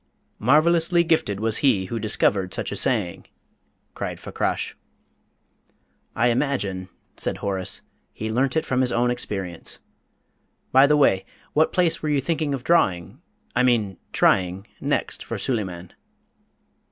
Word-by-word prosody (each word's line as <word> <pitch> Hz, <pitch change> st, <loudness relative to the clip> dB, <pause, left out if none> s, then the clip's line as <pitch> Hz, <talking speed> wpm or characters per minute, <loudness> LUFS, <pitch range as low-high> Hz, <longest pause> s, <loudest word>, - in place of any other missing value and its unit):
'" -, -, -45 dB
"Marvellously 165 Hz, +6 st, +4 dB
gifted 160 Hz, -, +1 dB
was 110 Hz, 0 st, 0 dB
he 115 Hz, -10 st, +2 dB
who 115 Hz, +5 st, -4 dB
discovered 100 Hz, -3 st, +1 dB
such -, -, -3 dB
a -, -, -3 dB
saying!" -, -, 0 dB, 0.7 s
cried -, -, -5 dB
Fakrash. -, -, -2 dB, 1.4 s
"I 120 Hz, +2 st, +3 dB
imagine," 110 Hz, -8 st, -1 dB, 0.3 s
said -, -, 0 dB
Horace, 95 Hz, -2 st, -1 dB, 0.3 s
"he 110 Hz, +1 st, -5 dB
learnt 130 Hz, +5 st, +1 dB
it 160 Hz, -, 0 dB
from 130 Hz, 0 st, +1 dB
his 125 Hz, -1 st, +1 dB
own 120 Hz, +1 st, +2 dB
experience. 95 Hz, -8 st, -4 dB, 0.9 s
By 135 Hz, +2 st, +7 dB
the 150 Hz, +1 st, +4 dB
way, 95 Hz, -10 st, +3 dB, 0.3 s
what 155 Hz, +1 st, +3 dB
place 175 Hz, -3 st, +2 dB
were 155 Hz, -, -2 dB
you 145 Hz, -2 st, +2 dB
thinking 155 Hz, 0 st, -1 dB
of 125 Hz, -, -8 dB
drawing 100 Hz, -, +1 dB, 0.3 s
I 125 Hz, -, +3 dB
mean 115 Hz, -6 st, +2 dB
trying 95 Hz, +2 st, +2 dB
next -, -, -1 dB
for -, -, -5 dB
Suleyman?" 95 Hz, -8 st, -3 dB
120 Hz, 140 wpm, -23 LUFS, 95-145 Hz, 1.4 s, By